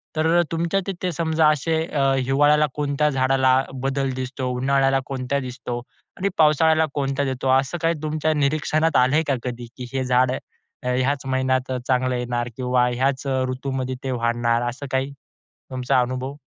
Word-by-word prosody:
तर 155 Hz, 0 st, +1 dB
अ, -, -, +6 dB
तुमच्या 170 Hz, +3 st, 0 dB
तिथे 180 Hz, -1 st, -3 dB
समजा 160 Hz, -1 st, +2 dB
असे 155 Hz, +2 st, +1 dB
अ, 150 Hz, -4 st, -2 dB, 0.2 s
हिवाळ्याला 145 Hz, +3 st, +4 dB
कोणत्या 150 Hz, 0 st, 0 dB
झाडाला 130 Hz, -1 st, +2 dB, 0.3 s
बदल 135 Hz, 0 st, 0 dB
दिस 130 Hz, 0 st, -4 dB
तो, 130 Hz, -1 st, -1 dB
उन्हाळ्याला 135 Hz, +1 st, +2 dB
कोणत्या 135 Hz, +1 st, -2 dB
दिसतो, 125 Hz, -2 st, -5 dB, 0.4 s
आणि 195 Hz, +1 st, 0 dB
पावसाळ्याला 160 Hz, +1 st, +4 dB
कोणत्या 140 Hz, -1 st, -1 dB
देतो. 130 Hz, 0 st, -2 dB
असं 135 Hz, +6 st, -3 dB
काही 165 Hz, 0 st, +2 dB
तुमच्या 155 Hz, +1 st, 0 dB
निरीक्षणात 155 Hz, +2 st, +1 dB
आलंय 130 Hz, +6 st, +3 dB
का, 140 Hz, -, +2 dB
कधी 120 Hz, -1 st, -5 dB
की 125 Hz, -1 st, -6 dB
हे 130 Hz, -1 st, 0 dB
झाड 125 Hz, 0 st, +3 dB, 0.5 s
अ, 125 Hz, -, -4 dB
ह्याच 130 Hz, +3 st, 0 dB
महिन्यात 130 Hz, 0 st, 0 dB, 0.2 s
चांगलं 130 Hz, 0 st, +1 dB
येणार, 120 Hz, 0 st, -2 dB
किंवा 125 Hz, -1 st, +2 dB
ह्याच 130 Hz, +2 st, 0 dB
अ, 130 Hz, -1 st, +1 dB
ऋतूमध्ये 130 Hz, 0 st, -3 dB
ते 135 Hz, -, -2 dB
वाढणार. 120 Hz, 0 st, 0 dB
असं 135 Hz, +4 st, -7 dB
काही 130 Hz, +1 st, 0 dB, 0.6 s
तुमचा 130 Hz, 0 st, +1 dB
अनुभव? 130 Hz, +2 st, -2 dB
135 Hz, 165 wpm, -22 LUFS, 125-150 Hz, 0.6 s, अ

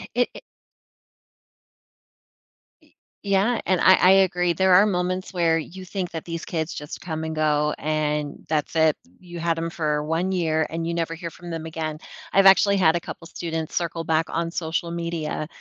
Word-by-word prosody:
It 245 Hz, 0 st, +2 dB
it -, -, -10 dB, 2.4 s
Y -, -, -27 dB, 0.3 s
yeah, 200 Hz, +4 st, +2 dB
and 185 Hz, -1 st, +2 dB
I 185 Hz, -, +7 dB
I 185 Hz, -, +5 dB
agree, 180 Hz, -2 st, +3 dB
there 190 Hz, +2 st, +3 dB
are 190 Hz, +3 st, +7 dB
moments 185 Hz, -1 st, -1 dB
where 165 Hz, -2 st, +2 dB
you 185 Hz, +4 st, -7 dB
think 185 Hz, -1 st, -4 dB
that 160 Hz, -1 st, -6 dB
these 165 Hz, -1 st, -5 dB
kids 160 Hz, -1 st, -3 dB
just 150 Hz, 0 st, -7 dB
come 160 Hz, -4 st, -5 dB
and 160 Hz, 0 st, -3 dB
go, 150 Hz, -1 st, +1 dB
and 150 Hz, -1 st, -2 dB
that's 155 Hz, 0 st, -1 dB
it. 160 Hz, -1 st, +3 dB, 0.2 s
You 175 Hz, -1 st, -9 dB
had 165 Hz, 0 st, 0 dB
them 165 Hz, 0 st, -2 dB
for 150 Hz, -3 st, -1 dB
1 165 Hz, +5 st, -1 dB
year, 160 Hz, -3 st, +1 dB
and 165 Hz, +1 st, -3 dB
you 170 Hz, -, -2 dB
never 165 Hz, -1 st, -2 dB
hear 170 Hz, 0 st, -6 dB
from 175 Hz, +2 st, -11 dB
them 165 Hz, -1 st, -5 dB
again. 155 Hz, -1 st, -4 dB, 0.3 s
I've 195 Hz, +1 st, +5 dB
actually 195 Hz, +1 st, +6 dB
had 175 Hz, -3 st, +4 dB
a -, -, -2 dB
couple 165 Hz, -, -9 dB
students 165 Hz, -2 st, -5 dB
circle 170 Hz, -1 st, -2 dB
back 160 Hz, 0 st, +1 dB
on 165 Hz, 0 st, -2 dB
social 170 Hz, 0 st, -2 dB
media 170 Hz, -3 st, -3 dB
165 Hz, 185 wpm, -24 LUFS, 160-180 Hz, 2.4 s, I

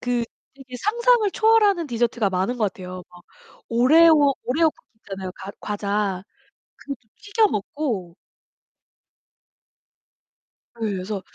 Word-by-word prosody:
그 245 Hz, -1 st, -1 dB, 0.3 s
이게 260 Hz, -2 st, -10 dB
상상을 475 Hz, 0 st, +3 dB
초월하는 420 Hz, -6 st, +3 dB
디저트가 235 Hz, -4 st, 0 dB
많은 190 Hz, +7 st, -1 dB
것 225 Hz, -, 0 dB
같아요. 185 Hz, -1 st, -8 dB
막 175 Hz, 0 st, -16 dB, 0.5 s
오레오 290 Hz, +4 st, +5 dB
오레오 315 Hz, +6 st, +2 dB
쿠키 -, -, -29 dB
있잖아요, 190 Hz, -3 st, -7 dB
과 190 Hz, -, -8 dB
과자. 205 Hz, -2 st, -2 dB, 0.5 s
그것도 280 Hz, -2 st, -7 dB, 0.2 s
튀겨 430 Hz, +1 st, +2 dB
먹고 205 Hz, -, -3 dB, 2.6 s
예 235 Hz, -, -21 dB
그래서 195 Hz, +1 st, -4 dB
240 Hz, 250 characters per minute, -23 LUFS, 195-325 Hz, 2.6 s, 오레오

